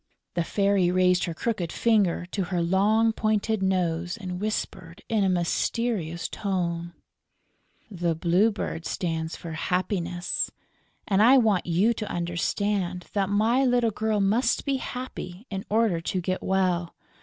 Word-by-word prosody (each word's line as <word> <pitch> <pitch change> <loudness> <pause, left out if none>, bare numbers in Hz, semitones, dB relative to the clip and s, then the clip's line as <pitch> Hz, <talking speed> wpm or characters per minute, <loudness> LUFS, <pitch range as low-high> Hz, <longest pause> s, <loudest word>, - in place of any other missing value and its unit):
The 170 - 0
Fairy 195 0 +2
raised 180 0 +3
her 170 - -4
crooked 185 -5 -2
finger 205 -7 +2
to 195 -3 -1
her 180 0 -2
long, 205 +6 +3
pointed 215 -1 0
nose, 175 -1 0
and 185 -3 -6
whispered, 205 -4 -4
in 220 -3 +2
a 190 - +3
mysterious 175 -1 -1
tone: 175 -3 -2 1.0
"The 170 -3 -1
Blue 175 +6 +3
Bird 195 -5 -4
stands 160 -2 -2
for 165 - -8
happiness; 180 +1 -1 0.6
and 195 0 +3
I 250 +5 +7
want 215 -8 +2
you 190 +7 +3
to 215 -2 -5
understand 180 +1 -1
that 200 -2 +1
my 225 +6 +3
little 245 -3 +3
girl 215 0 0
must 205 +6 +2
be 275 -2 +1
happy 250 -7 -6
in 195 -1 -4
order 215 -6 +2
to 185 +2 -2
get 185 +1 -2
well. 180 -3 0
190 Hz, 145 wpm, -26 LUFS, 175-215 Hz, 1.0 s, I